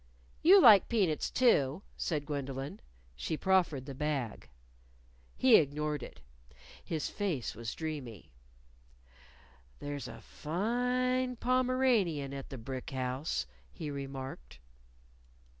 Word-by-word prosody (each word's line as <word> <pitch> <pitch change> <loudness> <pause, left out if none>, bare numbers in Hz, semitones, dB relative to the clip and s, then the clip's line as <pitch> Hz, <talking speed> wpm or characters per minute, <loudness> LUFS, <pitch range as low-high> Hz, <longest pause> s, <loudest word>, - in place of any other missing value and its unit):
"You 385 +5 +8
like 220 - +8
peanuts, 190 -10 +1
too," 175 - +3
said 150 -4 -2
Gwendolyn. 140 -2 -4 0.4
She 155 - -3
proffered 175 -8 +2
the 140 - -6
bag. 135 - -3 0.9
He 255 -3 +7
ignored 150 0 -1
it. 70 - -10 0.6
His 160 -2 -3
look 175 - -1
was 115 0 -5
dreamy. 145 - -6 1.5
"There's 145 -1 -5
a - - -9
fine 250 +8 -1
Pomeranian 245 - +1
at 135 -1 -7
the 135 - -7
brick 130 +2 -6
house," 130 +3 -2 0.3
he 150 -3 -6
remarked. 135 - -7
150 Hz, 105 wpm, -32 LUFS, 135-215 Hz, 1.5 s, You